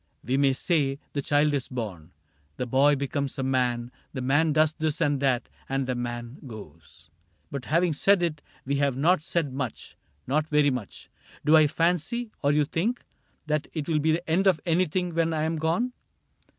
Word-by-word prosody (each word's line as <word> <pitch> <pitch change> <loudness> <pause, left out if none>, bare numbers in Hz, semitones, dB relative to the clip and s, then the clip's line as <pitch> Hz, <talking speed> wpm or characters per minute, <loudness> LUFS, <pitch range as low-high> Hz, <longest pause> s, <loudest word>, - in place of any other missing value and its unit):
We 125 - 0
may 140 -1 +3
say 140 -1 0 0.2
The 140 - -1
child 145 +1 +2
is 140 -3 -1
born, 95 -10 -6 0.5
the 125 - -2
boy 135 +4 +4
becomes 140 0 -3
a 135 - -1
man. 125 -2 0 0.2
The 130 - -4
man 145 +5 +3
does 155 0 +3
this 155 -1 -2
and 145 -2 +1
that, 130 -3 +1 0.2
and 135 0 0
the 125 - -1
man 120 0 -5
goes, 85 - -12 0.2
— - - -41
But 140 -2 -5
having 170 +2 +2
said 190 +5 +3
it 155 -3 -1 0.2
we 140 +1 0
have 140 -2 +1
not 170 +5 +3
said 155 -4 -1
much, 130 -4 -5 0.3
Not 150 +3 0
very 150 -1 +4
much. 125 -6 -6 0.3
Do 155 - +6
I 155 -1 +7
fancy, 175 +9 0
or 140 - +3
you 150 0 +3
think. 210 - -2 0.4
That 150 0 -1
it 155 -3 -3
will 160 -2 +1
be 160 +2 +2
the 170 +2 -3
end 180 +5 +2
of 180 -5 +4
anything 180 +1 +1
When 165 0 +1
I 155 -1 0
am 160 +1 -1
gone 170 +11 0
145 Hz, 190 wpm, -26 LUFS, 130-160 Hz, 0.5 s, I